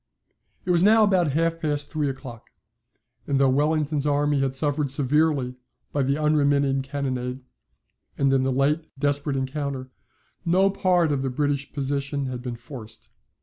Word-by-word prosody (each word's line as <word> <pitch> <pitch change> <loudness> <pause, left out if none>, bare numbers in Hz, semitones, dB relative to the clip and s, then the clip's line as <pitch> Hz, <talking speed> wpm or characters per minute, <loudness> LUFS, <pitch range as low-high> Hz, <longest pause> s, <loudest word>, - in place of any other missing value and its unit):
It 180 - +1
was 170 -1 +3
now 215 +3 +6
about 180 -8 +2
half 165 +2 +1
past 145 -2 -2
three 150 -3 0
o'clock; 130 -3 -9 0.8
and 140 -1 +1
though 135 -1 +4
Wellington's 150 +1 +1
army 145 0 +2
had 135 -1 0
suffered 145 0 +1
severely 140 -1 +1 0.4
by 145 - 0
the 135 +2 +1
unremitting 145 -3 +2
cannonade, 130 -2 -3 0.8
and 135 -1 +2
in 135 - +3
the 130 0 0
late 150 +5 +1
desperate 145 0 0
encounter, 135 -1 -3 0.5
no 185 +3 +3
part 180 -4 +2
of 140 -2 0
the 135 - -1
British 145 +1 -1
position 140 0 -2
had 125 -1 -5
been 125 -1 -5
forced. 115 -3 -11
140 Hz, 150 wpm, -24 LUFS, 135-150 Hz, 0.8 s, now